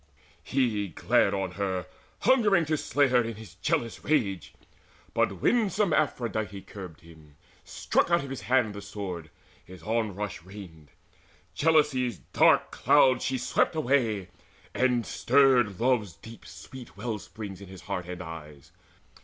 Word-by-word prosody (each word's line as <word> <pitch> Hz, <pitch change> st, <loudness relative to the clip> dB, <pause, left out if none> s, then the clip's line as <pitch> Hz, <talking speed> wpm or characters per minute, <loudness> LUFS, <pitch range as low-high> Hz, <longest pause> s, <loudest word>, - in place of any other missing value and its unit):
He 115 Hz, -7 st, 0 dB
glared 90 Hz, +3 st, +2 dB
on 95 Hz, -2 st, -2 dB
her, 95 Hz, -1 st, -2 dB, 0.4 s
Hungering 210 Hz, -10 st, +4 dB
to 155 Hz, +1 st, 0 dB
slay 145 Hz, -2 st, +1 dB
her 125 Hz, -1 st, +4 dB
in 115 Hz, -1 st, -4 dB
his 105 Hz, -5 st, -12 dB
jealous 110 Hz, +5 st, -2 dB
rage. 105 Hz, -, -1 dB, 0.6 s
But -, -, 0 dB
winsome 210 Hz, -6 st, +2 dB
Aphrodite 110 Hz, -9 st, -1 dB
curbed 90 Hz, -6 st, -10 dB
him, 80 Hz, -3 st, -17 dB, 0.3 s
struck -, -, 0 dB
Out 170 Hz, -2 st, +3 dB
of 135 Hz, -, -7 dB
his 135 Hz, -, -5 dB
hand 125 Hz, -5 st, +1 dB
the 100 Hz, -, -7 dB
sword, 95 Hz, -5 st, -6 dB, 0.3 s
his 90 Hz, -2 st, -13 dB
onrush 105 Hz, -3 st, -2 dB
reined, 90 Hz, -5 st, -12 dB, 0.6 s
Jealousy's 145 Hz, -, +2 dB, 0.2 s
dark -, -, +4 dB
cloud 130 Hz, -1 st, +4 dB
swept 130 Hz, +4 st, 0 dB
she -, -, -4 dB
away, 120 Hz, -, +1 dB, 0.4 s
and 125 Hz, -2 st, +1 dB
stirred 125 Hz, -7 st, +3 dB
Love's 115 Hz, -6 st, +1 dB
deep 115 Hz, +8 st, -13 dB
sweet 130 Hz, -3 st, -12 dB
well 115 Hz, -3 st, -3 dB
springs 100 Hz, -2 st, -9 dB
in 100 Hz, -, -10 dB
his 95 Hz, 0 st, -11 dB
heart 90 Hz, -3 st, -4 dB
and 90 Hz, 0 st, -6 dB
eyes. 75 Hz, -4 st, -10 dB
110 Hz, 140 wpm, -27 LUFS, 95-130 Hz, 0.6 s, Hungering